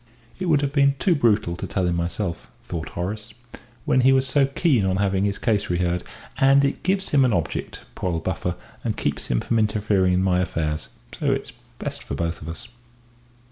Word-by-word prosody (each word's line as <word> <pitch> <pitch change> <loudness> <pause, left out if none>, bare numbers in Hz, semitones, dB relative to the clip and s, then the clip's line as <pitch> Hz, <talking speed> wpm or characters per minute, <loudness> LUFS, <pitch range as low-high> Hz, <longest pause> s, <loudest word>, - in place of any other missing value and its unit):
"It 185 - -2
would 150 -4 +4
have 140 -1 -1
been 140 -1 +4
too 185 +5 +3
brutal 110 - +2
to - - -5
tell 95 - 0
him 85 -1 +1
myself," 85 - -3
thought 85 -3 -5
Horace, 105 +5 -4 0.5
"when 130 - +3
he 130 +2 +5
was 135 0 +4
so 135 +1 +3
keen 135 - +2
on 95 -1 +1
having 100 0 +1
his 100 -1 -1
case 105 -4 0
reheard. 90 0 0 0.4
And 140 0 +5
it 140 - -1
gives 190 +1 0
him 140 -2 +4
an 125 -4 +3
object, 85 -3 -2
poor 90 - -2
old 80 -1 -3
buffer, 90 0 -2 0.3
and - - -2
keeps - - -2
him - - +1
from 115 - 0
interfering 105 -3 +2
in 90 +1 +2
my 90 -1 +2
affairs, 75 -3 -2 0.3
so - - 0
it's - - -3 0.2
best - - -5
for 70 - -5
both 85 +3 -2
of 80 - -7
us." 85 +8 -8
100 Hz, 205 wpm, -23 LUFS, 90-135 Hz, 0.5 s, he